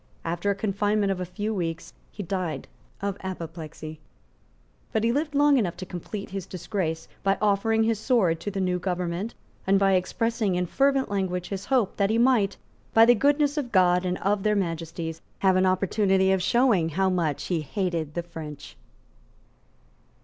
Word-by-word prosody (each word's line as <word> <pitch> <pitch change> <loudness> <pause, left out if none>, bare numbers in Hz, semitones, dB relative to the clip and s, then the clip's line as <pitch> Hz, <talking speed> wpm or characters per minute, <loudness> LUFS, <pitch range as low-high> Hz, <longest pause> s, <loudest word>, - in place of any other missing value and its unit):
After 170 +4 -1
a 200 - +2
confinement 205 0 0
of 190 - -2
a 180 - -2
few 210 +4 -3
weeks 170 -4 -4 0.2
he 205 - -6
died 180 -7 -3 0.4
of 200 -1 -1
apoplexy; 165 -4 -7 0.9
but 220 - 0
he 230 - +3
lived 290 +3 -1
long 290 -1 +5
enough 185 -6 -1
to 185 - -6
complete 190 +3 -7
his 195 -1 -5
disgrace 175 -3 -3
by 195 0 +2
offering 215 +2 +2
his 225 -1 +1
sword 205 -10 +2
to 205 - -4
the 200 -1 -4
new 180 -1 0
government, 180 +3 -3 0.3
and 195 +1 +5
by 195 0 +3
expressing 220 +2 0
in 180 0 0
fervent 275 +5 +1
language 180 -3 -2
his 195 -1 -4
hope 250 -7 +1
that 200 -1 +2
he 220 - +2
might, 230 -5 +3 0.4
by 225 0 +8
the 240 - +7
goodness 285 +4 +2
of 260 -5 -2
God 180 -2 +4
and 180 0 -1
of 200 +1 0
Their 210 +1 +2
Majesties, 165 -3 -3 0.2
have 190 -1 +3
an 185 0 +3
opportunity 190 0 +2
of 190 -1 +2
showing 215 -5 +3
how 190 +4 +1
much 165 -6 -1
he 170 -3 -1
hated 165 -2 -2
the 175 - -1
French. 155 -4 -9
190 Hz, 175 wpm, -26 LUFS, 175-215 Hz, 0.9 s, by